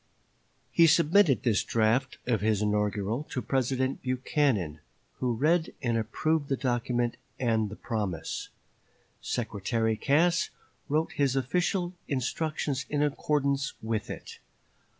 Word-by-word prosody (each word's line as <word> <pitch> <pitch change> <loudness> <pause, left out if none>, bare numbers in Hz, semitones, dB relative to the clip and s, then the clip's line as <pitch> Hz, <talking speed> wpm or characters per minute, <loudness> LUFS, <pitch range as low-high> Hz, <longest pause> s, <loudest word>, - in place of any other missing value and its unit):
He 165 -1 +6
submitted 165 -1 +4
this 110 -5 +2
draft 115 +4 +1
of 115 -6 +1
his 105 -1 +2
inaugural 105 +3 0
to - - -2
President 130 +2 0
Buchanan, 125 - 0 0.4
who 125 -2 0
read 160 +7 +1
and 120 -3 0
approved 145 +7 0
the 135 - +1
document 120 -1 0 0.2
and 110 -4 +1
the 105 - -7
promise. 100 -10 -3 0.7
Secretary 110 0 -1
Cass 160 +8 +2 0.4
wrote 155 +3 +1
his 140 -2 +1
official 175 - 0
instructions 140 -1 -2
in 145 0 +1
accordance 140 -1 0
with 110 -1 -3
it. - - -8
130 Hz, 115 wpm, -28 LUFS, 110-145 Hz, 0.7 s, He